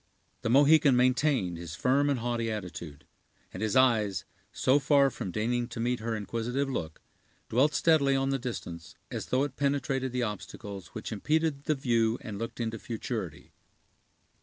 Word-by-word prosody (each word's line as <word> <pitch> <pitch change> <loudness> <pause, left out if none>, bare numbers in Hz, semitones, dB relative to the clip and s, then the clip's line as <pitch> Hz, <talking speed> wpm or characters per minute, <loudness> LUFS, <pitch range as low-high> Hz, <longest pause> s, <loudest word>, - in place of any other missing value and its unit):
The 120 - -1
Mohican 145 +1 +6
maintained 125 - +2
his 85 -1 -7
firm 140 +6 +2
and 140 - +1
haughty 120 -1 -1
attitude; 85 -8 -7 0.5
and 90 - -6
his 110 -2 0
eyes, 110 -9 +3 0.3
so 135 +2 +3
far 140 -1 +4
from 95 - -5
deigning 120 +5 -1
to 120 - -8
meet 120 +1 0
her 115 0 -2
inquisitive 115 +6 -2
look, 80 -12 -5 0.5
dwelt 145 +6 +3
steadily 145 -4 +4
on 135 0 +1
the 135 - 0
distance, 90 -9 -6 0.2
as - - -4
though 130 +2 +2
it 145 -3 -4
penetrated 135 -2 0
the 125 0 -1
obstacles 100 -3 -6
which 110 - -5
impeded 150 +5 0
the 155 - +2
view 115 -4 +1
and 105 -4 -6
looked 115 +1 -5
into 115 -1 -2
futurity. 115 0 -5
120 Hz, 160 wpm, -29 LUFS, 110-135 Hz, 0.5 s, Mohican